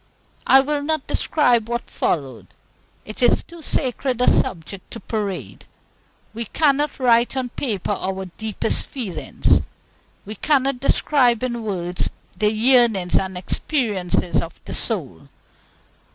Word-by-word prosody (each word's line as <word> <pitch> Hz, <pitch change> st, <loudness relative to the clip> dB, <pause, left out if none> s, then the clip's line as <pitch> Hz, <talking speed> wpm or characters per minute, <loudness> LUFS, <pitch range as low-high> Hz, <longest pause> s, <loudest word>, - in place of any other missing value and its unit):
I 270 Hz, -, +8 dB
will 290 Hz, +1 st, -1 dB
not 310 Hz, -1 st, -1 dB
describe 240 Hz, -7 st, +2 dB
what 240 Hz, 0 st, -3 dB
followed. 135 Hz, -8 st, -2 dB, 0.6 s
It 215 Hz, -, -9 dB
is 245 Hz, -, +4 dB
too 340 Hz, -1 st, -13 dB
sacred 260 Hz, -4 st, -1 dB
a 250 Hz, -, +2 dB
subject 180 Hz, +2 st, 0 dB
to 230 Hz, -, -8 dB
parade. 205 Hz, -5 st, -4 dB, 0.7 s
We 230 Hz, +1 st, -4 dB
cannot 290 Hz, +3 st, +1 dB
write 240 Hz, 0 st, +3 dB
on 255 Hz, -1 st, -1 dB
paper 215 Hz, -7 st, -3 dB
our 190 Hz, -1 st, -3 dB
deepest 215 Hz, +4 st, -3 dB
feelings; 185 Hz, -, 0 dB, 0.6 s
we 210 Hz, -, -6 dB
cannot 275 Hz, 0 st, +1 dB
describe 255 Hz, -3 st, +2 dB
in 240 Hz, -2 st, -2 dB
words 180 Hz, -5 st, -3 dB, 0.3 s
the 210 Hz, 0 st, +2 dB
yearnings 225 Hz, -5 st, +4 dB
and 190 Hz, -1 st, 0 dB
experiences 185 Hz, -, -1 dB
of 165 Hz, -, -8 dB
the -, -, -6 dB
soul. -, -, -2 dB
230 Hz, 125 wpm, -21 LUFS, 190-265 Hz, 0.7 s, I